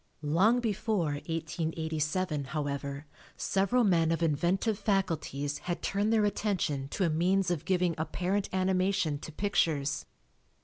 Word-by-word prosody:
Long 195 Hz, +11 st, +3 dB
before 215 Hz, -6 st, 0 dB, 0.2 s
1887, 160 Hz, -1 st, -2 dB
however, 140 Hz, -1 st, -3 dB, 0.3 s
several 200 Hz, +6 st, +2 dB
men 165 Hz, -5 st, +3 dB
of 165 Hz, 0 st, 0 dB
inventive 180 Hz, +7 st, +1 dB
faculties 165 Hz, -8 st, -1 dB
had 175 Hz, -1 st, -4 dB
turned 205 Hz, +2 st, +1 dB
their 220 Hz, -2 st, +4 dB
attention 185 Hz, -9 st, -1 dB
to 190 Hz, -, -2 dB
a -, -, +2 dB
means 180 Hz, +3 st, +2 dB
of 170 Hz, -4 st, -2 dB
giving 180 Hz, -2 st, +2 dB
apparent 180 Hz, +5 st, -1 dB
animation 185 Hz, -4 st, +1 dB
to 160 Hz, -, -8 dB
pictures. 150 Hz, -6 st, 0 dB
175 Hz, 125 wpm, -30 LUFS, 155-195 Hz, 0.3 s, their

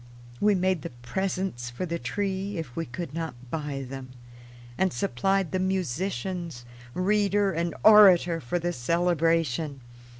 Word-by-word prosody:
We 210 Hz, -1 st, +4 dB
made 185 Hz, -2 st, +1 dB
the -, -, -5 dB
presents 125 Hz, +1 st, -3 dB
for 120 Hz, +10 st, -4 dB
the 170 Hz, -1 st, -3 dB
tree 195 Hz, 0 st, -2 dB
if 150 Hz, -7 st, -6 dB
we 165 Hz, -, -3 dB
could 145 Hz, +4 st, -6 dB
not 165 Hz, -5 st, -4 dB, 0.2 s
buy 145 Hz, -4 st, -3 dB
them, 135 Hz, 0 st, -8 dB, 0.7 s
and 190 Hz, +5 st, +1 dB
supplied 180 Hz, +9 st, 0 dB
the 185 Hz, -, 0 dB
musicians, 180 Hz, -4 st, -2 dB, 0.3 s
reader, 200 Hz, +1 st, +2 dB
and 170 Hz, -1 st, -2 dB
orator 185 Hz, -6 st, +7 dB
for 125 Hz, +8 st, -2 dB
the 175 Hz, 0 st, -2 dB
celebration. 165 Hz, -2 st, 0 dB
170 Hz, 135 wpm, -27 LUFS, 140-190 Hz, 0.7 s, orator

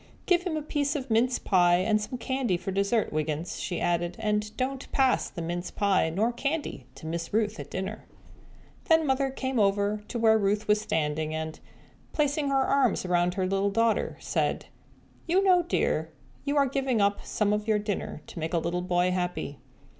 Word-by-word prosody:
"Give 355 Hz, -1 st, +3 dB
him 355 Hz, -4 st, -2 dB
a 305 Hz, -, -3 dB
piece 290 Hz, -1 st, -1 dB
of 270 Hz, -4 st, -4 dB
mince 245 Hz, +3 st, +3 dB
pie 175 Hz, -2 st, +4 dB
and 215 Hz, +4 st, +2 dB
some 230 Hz, +4 st, -4 dB
candy 250 Hz, -6 st, -1 dB
for 190 Hz, +2 st, -5 dB
dessert, 200 Hz, +3 st, +1 dB
Wiggins," 155 Hz, +2 st, -2 dB
she 175 Hz, -, -3 dB
added, 175 Hz, 0 st, 0 dB
"and 210 Hz, -1 st, 0 dB
don't 265 Hz, +1 st, -3 dB
pass 265 Hz, -2 st, +2 dB
the 170 Hz, -, -6 dB
mince 175 Hz, +2 st, -3 dB
pie 195 Hz, -5 st, +2 dB
nor 215 Hz, +9 st, 0 dB
candy 275 Hz, -, -3 dB
to -, -, -11 dB
Miss 165 Hz, +1 st, -4 dB
Ruth 215 Hz, 0 st, 0 dB
at -, -, -7 dB
dinner." 190 Hz, +3 st, -5 dB, 0.8 s
Then 320 Hz, -2 st, +4 dB
Mother 270 Hz, 0 st, +1 dB
came 260 Hz, -1 st, -2 dB
over 205 Hz, +1 st, +1 dB
to 240 Hz, -, -4 dB
where 220 Hz, -1 st, +4 dB
Ruth 205 Hz, +1 st, 0 dB
was 210 Hz, 0 st, +3 dB
standing 155 Hz, -3 st, -1 dB
and, 160 Hz, 0 st, -4 dB, 0.5 s
placing 290 Hz, -1 st, +1 dB
her 270 Hz, -1 st, +3 dB
arms 260 Hz, -9 st, +2 dB
around 175 Hz, 0 st, +1 dB
her 190 Hz, -, 0 dB
little 195 Hz, +2 st, +1 dB
daughter, 225 Hz, +2 st, +1 dB
said, -, -, -1 dB, 0.6 s
"You 370 Hz, +4 st, +3 dB
know, 365 Hz, -2 st, +5 dB
dear, 345 Hz, -, 0 dB, 0.4 s
you 285 Hz, +1 st, 0 dB
are 280 Hz, -, +5 dB
giving 265 Hz, -3 st, 0 dB
up 200 Hz, 0 st, +1 dB
some 210 Hz, -1 st, 0 dB
of 210 Hz, +1 st, -2 dB
your 215 Hz, -1 st, +3 dB
dinner 205 Hz, -6 st, -4 dB
to -, -, -9 dB
make 160 Hz, +2 st, -2 dB
a -, -, +3 dB
little 170 Hz, +2 st, -1 dB
boy 180 Hz, 0 st, +1 dB
happy." 180 Hz, -6 st, -3 dB
210 Hz, 190 wpm, -28 LUFS, 180-260 Hz, 0.8 s, know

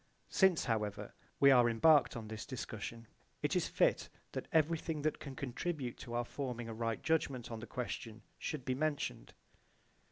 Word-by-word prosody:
Since, 190 Hz, -4 st, +4 dB
however, 105 Hz, -4 st, -2 dB, 0.3 s
we 140 Hz, 0 st, +8 dB
are 120 Hz, -2 st, +6 dB
embarked 145 Hz, +4 st, +5 dB
on 110 Hz, -2 st, -6 dB
this 110 Hz, 0 st, -6 dB
discussion, 115 Hz, -2 st, -5 dB, 0.4 s
it -, -, +1 dB
is -, -, +2 dB
fit -, -, +2 dB, 0.2 s
that -, -, -4 dB
everything 160 Hz, -1 st, +1 dB
that 155 Hz, -, 0 dB
can 140 Hz, -2 st, -7 dB
contribute 140 Hz, 0 st, -3 dB
to 120 Hz, -2 st, -6 dB
our 120 Hz, 0 st, 0 dB
forming 125 Hz, -3 st, -4 dB
a 115 Hz, -, -5 dB
right 115 Hz, 0 st, -2 dB
judgment 135 Hz, -7 st, 0 dB
on 115 Hz, -, -4 dB
the 120 Hz, -, -8 dB
question 115 Hz, -3 st, -5 dB, 0.2 s
should 145 Hz, -5 st, -4 dB
be 130 Hz, -, +1 dB
mentioned. 145 Hz, +2 st, -2 dB
125 Hz, 165 wpm, -35 LUFS, 115-150 Hz, 0.4 s, we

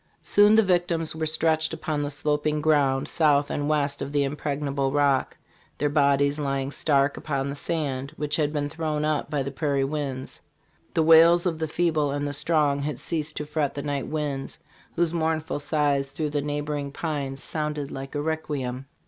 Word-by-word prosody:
"Soon 205 Hz, +1 st, +5 dB
the 220 Hz, -, +6 dB
victims 175 Hz, -4 st, 0 dB
were 160 Hz, 0 st, -1 dB
stretched 160 Hz, 0 st, +1 dB
upon 155 Hz, -2 st, -2 dB
the 145 Hz, -, -2 dB
sloping 150 Hz, +1 st, 0 dB
ground 145 Hz, -3 st, +2 dB
south 145 Hz, -3 st, +2 dB
and 145 Hz, 0 st, -1 dB
west 145 Hz, -2 st, 0 dB
of 140 Hz, -, -4 dB
the 145 Hz, -1 st, +2 dB
impregnable 140 Hz, -1 st, -2 dB
Rock, 140 Hz, -2 st, +1 dB, 0.4 s
their 145 Hz, -, +1 dB
bodies 140 Hz, 0 st, +2 dB
lying 135 Hz, -1 st, -1 dB
stark 140 Hz, -1 st, +2 dB
upon 140 Hz, -2 st, -2 dB
the 140 Hz, -, -4 dB
sand 140 Hz, -4 st, -2 dB
which 150 Hz, 0 st, -1 dB
had 150 Hz, -2 st, +1 dB
been 145 Hz, -1 st, -1 dB
thrown 155 Hz, -1 st, -2 dB
up 155 Hz, -2 st, -1 dB
by 145 Hz, -2 st, -1 dB
the 140 Hz, -, -4 dB
prairie 140 Hz, -1 st, 0 dB
winds. 135 Hz, -2 st, -4 dB, 0.5 s
The 160 Hz, -, +3 dB
wails 165 Hz, +2 st, +7 dB
of 165 Hz, -3 st, -1 dB
the 160 Hz, -, -1 dB
feeble 155 Hz, -2 st, +1 dB
and 145 Hz, +1 st, -2 dB
the 145 Hz, -, -3 dB
strong 150 Hz, -1 st, +2 dB
had 145 Hz, -2 st, -3 dB
ceased 155 Hz, -2 st, -3 dB
to 150 Hz, -, -3 dB
fret 150 Hz, -1 st, -1 dB
the 140 Hz, -, -4 dB
night 145 Hz, -2 st, -2 dB
winds, 145 Hz, -3 st, -3 dB, 0.4 s
whose 170 Hz, -1 st, +1 dB
mournful 160 Hz, -2 st, -1 dB
sighs 145 Hz, -2 st, 0 dB
through 150 Hz, +1 st, -3 dB
the 145 Hz, -1 st, 0 dB
neighboring 145 Hz, -1 st, -3 dB
pines 140 Hz, -3 st, -4 dB
sounded 150 Hz, -2 st, -3 dB
like 135 Hz, +2 st, -7 dB
a 145 Hz, -, 0 dB
requiem. 140 Hz, -5 st, -3 dB
145 Hz, 180 wpm, -25 LUFS, 140-155 Hz, 0.5 s, wails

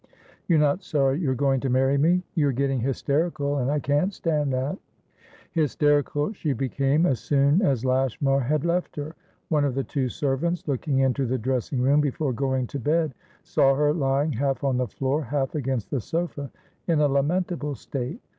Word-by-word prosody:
"You're 170 Hz, -, +4 dB
not 150 Hz, +4 st, +2 dB
sorry 140 Hz, -4 st, +1 dB
you're 135 Hz, -7 st, 0 dB
going 135 Hz, 0 st, +1 dB
to 135 Hz, -, -2 dB
marry 130 Hz, +2 st, +2 dB
me?" 170 Hz, +6 st, +3 dB
"You're 145 Hz, -5 st, +2 dB
getting 135 Hz, +1 st, 0 dB
hysterical, 145 Hz, +3 st, -1 dB
and 130 Hz, 0 st, 0 dB
I 150 Hz, -, +1 dB
can't 145 Hz, +7 st, +1 dB
stand 150 Hz, -6 st, -1 dB
that." 130 Hz, +8 st, -2 dB, 0.7 s
Hysterical 145 Hz, -, +1 dB
she 155 Hz, -8 st, -2 dB
became 135 Hz, +4 st, +1 dB
as 130 Hz, -9 st, +1 dB
soon 140 Hz, -, +2 dB
as 135 Hz, -, +1 dB
Lashmar 135 Hz, +1 st, +1 dB
had 145 Hz, +4 st, 0 dB
left 175 Hz, +1 st, -1 dB
her. 150 Hz, +2 st, -6 dB, 0.3 s
One 150 Hz, -3 st, +2 dB
of 140 Hz, -3 st, 0 dB
the 135 Hz, -, 0 dB
two 130 Hz, +1 st, -2 dB
servants, 150 Hz, +7 st, -1 dB
looking 140 Hz, 0 st, -1 dB
into 135 Hz, 0 st, +1 dB
the 130 Hz, +2 st, 0 dB
dressing 125 Hz, +1 st, -1 dB
room 140 Hz, +3 st, +4 dB
before 145 Hz, -1 st, -1 dB
going 130 Hz, 0 st, 0 dB
to 140 Hz, -, -6 dB
bed, 155 Hz, +2 st, +1 dB, 0.3 s
saw 135 Hz, 0 st, +3 dB
her 150 Hz, +1 st, +2 dB
lying, 140 Hz, 0 st, +1 dB
half 135 Hz, +2 st, -1 dB
on 135 Hz, -2 st, +1 dB
the 125 Hz, -1 st, 0 dB
floor, 135 Hz, +5 st, -1 dB
half 135 Hz, +1 st, -2 dB
against 130 Hz, -6 st, -2 dB
the 135 Hz, -, -1 dB
sofa, 160 Hz, -1 st, -3 dB, 0.4 s
in 165 Hz, -3 st, +2 dB
a 150 Hz, -, +4 dB
lamentable 150 Hz, +1 st, 0 dB
state. 130 Hz, -, -5 dB
140 Hz, 180 wpm, -25 LUFS, 135-150 Hz, 0.7 s, You're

